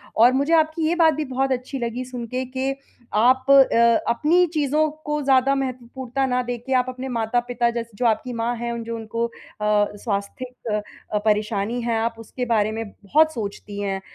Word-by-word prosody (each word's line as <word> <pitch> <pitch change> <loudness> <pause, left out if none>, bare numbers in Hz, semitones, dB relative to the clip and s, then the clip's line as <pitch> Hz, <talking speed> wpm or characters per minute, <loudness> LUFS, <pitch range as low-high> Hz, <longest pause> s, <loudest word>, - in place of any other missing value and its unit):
और 240 +3 +6
मुझे 280 +5 +1
आपकी 315 0 0
ये 340 - +1
बात 325 -2 +5
भी 305 +1 -3
बहुत 265 0 -1
अच्छी 260 +2 -3
लगी 240 +1 -3
सुन 250 -2 -6
के 255 +3 -3
कि 260 +1 -2 0.4
आप 255 +4 +4
अ, - - +8 0.6
अपनी 325 +9 +3
चीज़ों 305 0 +2 0.2
को 300 0 -1
ज़्यादा 270 0 +3
महत्वपूर्णता 260 0 -3
ना 250 0 +1
देके 245 +2 -4
आप 250 -1 +3
अपने 255 +1 -6
माता-पिता 240 +1 0
जैसे 235 -1 -5
जो 250 - -1
आपकी 230 +2 +1
माँ 235 +1 -1
हैं 235 +1 -3
उन 235 -1 -4
जो 230 0 -5
उनको 230 +1 -3
अ, - - -20 0.6
स्वास्थिक 205 +4 -4 0.7
परेशानी 210 +2 0
है, 235 -1 0
आप 230 +1 -1
उसके 245 +3 -5
बारे 215 -3 +1
में 225 +1 -3
बहुत 300 +11 +2
सोचती 205 -2 -6
हैं। 195 -1 -2
245 Hz, 180 wpm, -23 LUFS, 230-265 Hz, 0.7 s, अ